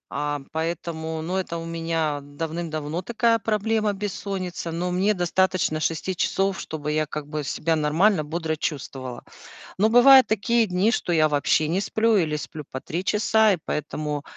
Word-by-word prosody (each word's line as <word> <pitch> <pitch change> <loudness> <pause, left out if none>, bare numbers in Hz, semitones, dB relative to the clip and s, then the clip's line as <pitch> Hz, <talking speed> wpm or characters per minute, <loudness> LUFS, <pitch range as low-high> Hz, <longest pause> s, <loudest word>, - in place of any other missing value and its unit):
А 145 -1 -2
поэтому 160 0 -3
ну, 180 +3 -3
это 180 -3 -3
у 165 - -6
меня 165 -3 -1
давным-давно 155 +2 -4
такая 230 +3 +1
проблема, 215 0 0
бессонница. 190 -4 -4
Но 175 +2 -2
мне 190 +4 +2
достаточно 180 -2 +1
6 165 +4 -2
часов, 195 +2 0
чтобы 150 -1 -4
я, 155 0 0
как 150 0 -6
бы, 150 0 -4
себя 160 +3 0
нормально, 160 +4 +2
бодро 160 +1 -2
чувствовала. 135 -5 -5 0.5
Но 210 +3 +3
бывают 260 +3 +8
такие 225 +2 +2
дни, 185 +2 +1
что 210 - -1
я 155 -2 +4
вообще 150 +1 +2
не 175 +4 0
сплю 220 +1 +2
или 155 -4 +1
сплю 150 0 -7
по 130 - -6
3 170 +4 -4
часа. 215 0 +3
И - - -1
поэтому, 150 -1 -3
170 Hz, 165 wpm, -24 LUFS, 155-200 Hz, 0.5 s, бывают